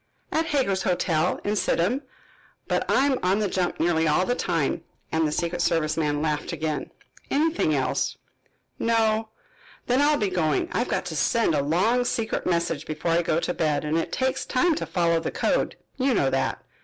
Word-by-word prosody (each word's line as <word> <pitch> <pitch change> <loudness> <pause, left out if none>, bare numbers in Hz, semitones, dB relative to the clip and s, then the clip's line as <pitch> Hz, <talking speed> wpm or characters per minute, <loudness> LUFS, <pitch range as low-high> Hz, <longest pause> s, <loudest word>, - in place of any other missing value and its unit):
"At 320 +1 0
Hager's 255 -11 +1
Hotel, 175 -2 +1
in 205 +1 0
Sidham. 210 +6 +1 0.7
But - - -1
I 270 - +4
am 270 -3 +1
on 185 +2 +2
the 210 -1 +1
jump 180 -1 -1
nearly 160 -1 +2
all 155 +5 +3
the 245 - +1
time," 165 - -1 0.3
and 160 -1 +2
the - - -2
secret 170 +2 -1
service 155 -3 +1
man 150 -2 0
laughed 150 -2 -1
again. 155 -2 -3 0.4
"Anything 300 - +1
else?" 130 -2 -1 0.6
"No." 225 -1 +1 0.6
"Then 250 +3 +2
I'll 295 +1 +4
be 205 -6 0
going. 155 -6 0
I've 240 - -1
got - - -1
to 170 -3 -5
send 225 +4 +2
a 145 - +2
long 190 - +2
secret 230 -2 -2
message 170 -4 -1
before 160 +2 -2
I 170 +1 +3
go 165 -1 +1
to 175 - -1
bed 150 -3 0
and 150 +1 0
it 165 - -1
takes 260 0 0
time 320 +7 +2
to - - -3
follow 170 -2 +2
the 165 - -3
code, - - 0 0.2
you 260 -2 +2
know 135 -8 +2
that. 135 - -1
175 Hz, 190 wpm, -25 LUFS, 160-230 Hz, 0.7 s, I